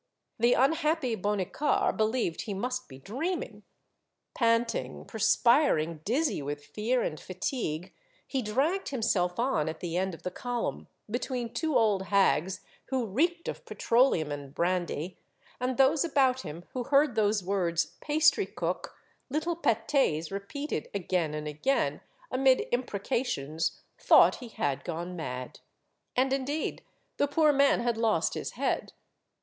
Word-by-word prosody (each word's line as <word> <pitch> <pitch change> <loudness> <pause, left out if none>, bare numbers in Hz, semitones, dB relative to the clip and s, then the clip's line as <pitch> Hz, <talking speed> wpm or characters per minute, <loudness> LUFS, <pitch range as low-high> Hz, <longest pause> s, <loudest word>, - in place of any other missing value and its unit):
The 240 +2 +5
unhappy 300 -2 +2
Bonnicar 205 +8 0
believed 220 -5 0
he 205 - -4
must 250 +5 -3
be 130 - -10
dreaming. 270 - -4 0.7
Panting, 230 -1 0
perspiring, 220 - +3
dizzy 270 - 0
with 145 +1 -5
fear 240 +4 0
and 155 - -3
fatigue, 185 - -3 0.3
he 270 - -2
dragged 275 - 0
himself 210 -9 0
on 235 - +1
at 160 - -6
the 175 -1 -3
end 190 -1 -1
of - - -17
the 180 - -3
column, 245 +4 -3 0.2
between 245 +1 -3
two 315 -5 +1
old 210 -5 +2
hags 190 -1 +2 0.2
who 260 -3 -1
reeked 335 - 0
of - - -5
petro 240 +3 +3
leum 155 - -1
and 145 -1 -7
brandy, 175 -1 -1 0.4
and 250 0 -1
those 270 +3 +4
about 265 -5 +2
him 165 0 -8
who 250 -2 -3
heard 285 0 +4
those 210 -2 +2
words, 175 -3 0
pastry 310 +6 +3
cook," - - -4 0.2
" - - -42
little 315 +5 -1
pat^s," 225 - +1
repeated 200 - -4
again 175 -5 0
and 150 0 -4
again, 155 - 0 0.3
amid 260 0 +4
imprecations, 200 - -1 0.2
thought - - +6
he 245 - -9
had 140 -10 -2
gone 175 +1 -4
mad. 125 -6 -6 0.6
And 265 +1 +2
indeed 275 +3 -2 0.3
the 285 - +2
poor 300 +1 +4
man 280 -3 +4
had 235 -1 0
lost 225 -2 +2
his - - -4
head. - - -1
230 Hz, 140 wpm, -29 LUFS, 175-270 Hz, 0.7 s, thought